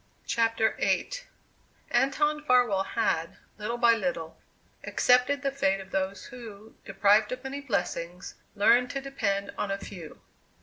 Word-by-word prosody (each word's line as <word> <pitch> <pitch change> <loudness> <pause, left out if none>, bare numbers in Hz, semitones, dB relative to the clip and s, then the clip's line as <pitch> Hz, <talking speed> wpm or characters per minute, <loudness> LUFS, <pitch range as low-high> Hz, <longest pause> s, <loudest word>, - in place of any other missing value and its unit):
CHAPTER 225 -1 +1
VIII - - +1 0.8
Anton 295 +4 +2
Farwell 245 -8 +3
had, 180 -6 -1 0.2
little 225 +3 -3
by 235 -1 +5
little, 175 -6 -3 0.5
accepted 250 +3 +3
the 275 - 0
fate 195 -8 +1
of 195 0 -11
those 190 0 -2
who, 220 -4 -11
deprived 205 +2 +3
of 255 0 -5
many 275 +1 -5
blessings, 180 -7 -3 0.2
learn 240 +4 +4
to 275 - -4
depend 200 -8 -2
on 205 - -1
a 195 - -1
few. 180 -5 -10
220 Hz, 135 wpm, -28 LUFS, 195-250 Hz, 0.8 s, by